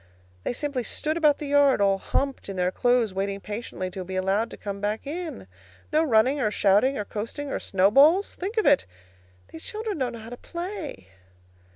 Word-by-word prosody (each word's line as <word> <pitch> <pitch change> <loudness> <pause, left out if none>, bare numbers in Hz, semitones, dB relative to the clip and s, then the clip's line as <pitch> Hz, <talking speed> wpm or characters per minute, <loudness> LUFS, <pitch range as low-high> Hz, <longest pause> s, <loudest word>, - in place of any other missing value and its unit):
They - - -1
simply 275 -1 -2
stood 310 +7 -2
about 300 -3 +4
the 300 - -6
yard, 285 -3 +4
all 195 -1 +3
humped 275 -1 -2
in 195 - -4
their 180 0 +1
clothes, 245 -2 +2
waiting 195 +1 -2
patiently 205 -3 -5
to 185 +1 -5
be 185 +1 -6
allowed 195 +5 +1
to - - -10
come 200 -1 -6
back 210 +4 -2
in. 320 - -5 0.5
No 310 +1 +4
running 260 +1 +3
or 215 - +2
shouting 210 +7 +3
or 205 - -3
coasting 230 +8 -5
or - - -1
snowballs. 275 - +4
Think 400 +6 -5
of 435 - +2
it! 285 -1 +4 0.6
These 160 - -10
children 430 -5 -4
don't 250 -2 -1
know - - -7
how 225 +1 -10
to 245 - -7
play. 340 - -6
245 Hz, 195 wpm, -26 LUFS, 200-295 Hz, 0.6 s, about